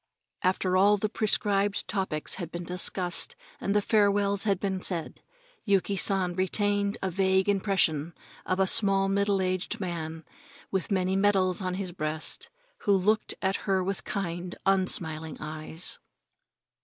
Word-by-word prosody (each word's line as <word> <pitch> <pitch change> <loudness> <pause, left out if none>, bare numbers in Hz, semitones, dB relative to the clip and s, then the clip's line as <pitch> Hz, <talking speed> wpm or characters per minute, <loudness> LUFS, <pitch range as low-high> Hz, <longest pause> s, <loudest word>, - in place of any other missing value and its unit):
After 185 0 +1
all 200 +2 +5
the 215 +2 -1
prescribed 205 -1 0
topics 190 -7 -2
had 170 -1 -6
been 175 0 -5
discussed 180 0 +1 0.2
and 200 - -1
the 205 - +3
farewells 200 -1 +2
had 200 -3 +1
been 190 -2 -2
said, 170 -4 -4 0.4
Yuki 200 -1 +1
San 190 -1 +2
retained 205 +3 0
a 190 - -1
vague 190 +1 +2
impression 185 -6 +1 0.3
of 185 - -1
a 190 - +4
small, 195 -1 +5
middle 200 -1 +1
aged 185 +4 -1
man, 165 -3 -5 0.5
with 190 +1 -2
many 185 -1 +1
medals 195 -2 +2
on 185 -1 -2
his 190 -2 -4
breast, 155 -2 -4 0.3
who 205 - +2
looked 205 +3 +1
at 190 +1 +1
her 190 -1 +2
with 195 +1 -3
kind, 175 -2 -4
unsmiling 160 -5 +1
eyes. 155 +2 -5
190 Hz, 145 wpm, -28 LUFS, 180-200 Hz, 0.5 s, all